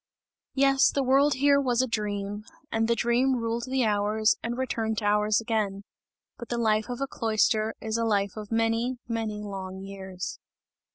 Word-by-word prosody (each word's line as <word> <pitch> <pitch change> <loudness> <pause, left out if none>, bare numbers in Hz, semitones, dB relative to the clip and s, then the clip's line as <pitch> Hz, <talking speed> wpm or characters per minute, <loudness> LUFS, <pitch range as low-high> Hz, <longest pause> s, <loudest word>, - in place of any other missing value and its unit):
Yes, 270 0 +4
the 280 - 0
world 275 +3 +4
here 280 +1 +4
was 250 -2 +2
a - - -1
dream, 205 -2 -3 0.3
and 225 0 +1
the 235 - +2
dream 245 +3 +2
ruled 230 0 -2
the 260 -1 +1
hours 210 +1 +2
and 235 +1 -3
returned 225 -4 -2
to 210 - -2
hours 210 0 +3
again. 215 -4 -2 0.6
But 235 - -8
the 240 - -1
life 220 0 +1
of 245 +1 -5
a 275 - 0
cloister 220 -2 +1
is 220 +1 -2
a - - +1
life 200 -3 0
of 215 -1 -8
many, 230 +2 +1
many 220 -3 -3
long 190 -2 -6
years. 190 -2 -7
225 Hz, 175 wpm, -27 LUFS, 210-245 Hz, 0.6 s, Yes